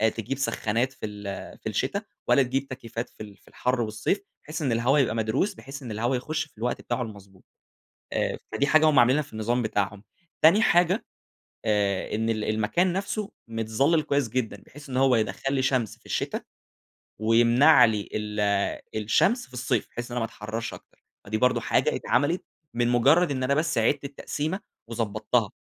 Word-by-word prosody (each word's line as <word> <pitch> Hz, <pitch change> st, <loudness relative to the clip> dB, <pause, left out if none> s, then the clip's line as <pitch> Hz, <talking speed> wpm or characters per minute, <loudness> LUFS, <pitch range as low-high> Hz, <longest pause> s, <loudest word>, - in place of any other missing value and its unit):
تجيب 115 Hz, +4 st, -3 dB
سخانات 125 Hz, -2 st, 0 dB
في 120 Hz, -, -7 dB
ال 105 Hz, -2 st, -7 dB
في -, -, -4 dB
الشتا، -, -, -1 dB, 0.3 s
ولا 140 Hz, -, +5 dB
تجيب 135 Hz, +2 st, -2 dB
تكييفات 120 Hz, -2 st, -6 dB
في 110 Hz, -, -10 dB
ال 100 Hz, -2 st, -12 dB
في -, -, -29 dB
الحر 125 Hz, -1 st, -1 dB
والصيف، 110 Hz, -, -1 dB, 0.2 s
بحيث 155 Hz, +2 st, -5 dB
إن 135 Hz, -5 st, 0 dB
الهوا 125 Hz, +6 st, +3 dB
يبقى 115 Hz, -4 st, +2 dB
مدروس، 110 Hz, -, 0 dB
بحيث 135 Hz, -4 st, -10 dB
إن 115 Hz, -, -6 dB
الهوا 120 Hz, +5 st, 0 dB
يخش 155 Hz, +5 st, -2 dB
في 145 Hz, -, -28 dB
الوقت 120 Hz, +2 st, -2 dB
بتاعه 120 Hz, +1 st, -2 dB
المضبوط، 100 Hz, -4 st, -9 dB, 0.7 s
آآ -, -, 0 dB
فدي 140 Hz, -, +1 dB
حاجة 155 Hz, +1 st, +5 dB
هُم 145 Hz, -4 st, +5 dB
عاملينها 130 Hz, +5 st, +5 dB
في 140 Hz, -, -18 dB
النظام 120 Hz, +3 st, 0 dB
بتاعهم، 105 Hz, -2 st, -1 dB, 0.4 s
تاني 185 Hz, +8 st, +7 dB
حاجة، 180 Hz, +1 st, +3 dB, 0.6 s
آآ، 100 Hz, -2 st, 0 dB
إن 115 Hz, +1 st, 0 dB
ال 110 Hz, -1 st, -1 dB
المكان 110 Hz, +13 st, +1 dB
نفْسه 200 Hz, +2 st, -3 dB, 0.2 s
متظلل 115 Hz, +8 st, +1 dB
كويّس 140 Hz, -5 st, 0 dB
جدًا؛ 125 Hz, -1 st, -2 dB
بحيث 145 Hz, 0 st, -13 dB
إن 125 Hz, -, -3 dB
هو 130 Hz, -2 st, +4 dB
يدخَّل 135 Hz, +5 st, -1 dB
لي 130 Hz, -, +1 dB
شمس 125 Hz, -6 st, 0 dB
في -, -, -23 dB
الشتا، -, -, -2 dB, 0.8 s
ويمنع 120 Hz, +7 st, +6 dB
لي 105 Hz, -3 st, -1 dB
ال 105 Hz, 0 st, -3 dB, 0.6 s
الشمس 155 Hz, -, +2 dB
في 130 Hz, -, -24 dB
الصيف؛ 125 Hz, -2 st, -1 dB
بحيث 120 Hz, 0 st, -6 dB
إن 125 Hz, -, -3 dB
أنا -, -, +2 dB
ما 115 Hz, -, 0 dB
أتحررش 110 Hz, +1 st, -5 dB
أكتر، -, -, -15 dB, 0.2 s
فدي 110 Hz, +2 st, -1 dB
برضو 125 Hz, +2 st, +3 dB
حاجة -, -, +1 dB
اتعملت 165 Hz, +5 st, 0 dB, 0.3 s
من 120 Hz, 0 st, +1 dB
مجرّد 145 Hz, +7 st, +4 dB
إن 130 Hz, -1 st, -1 dB
أنا 140 Hz, +2 st, +2 dB
بس 155 Hz, -4 st, 0 dB
عِدت 135 Hz, +6 st, +2 dB
التقسيمة 150 Hz, +5 st, -3 dB, 0.3 s
وضبطتها، 110 Hz, -1 st, 0 dB
120 Hz, 180 wpm, -26 LUFS, 110-140 Hz, 0.8 s, تاني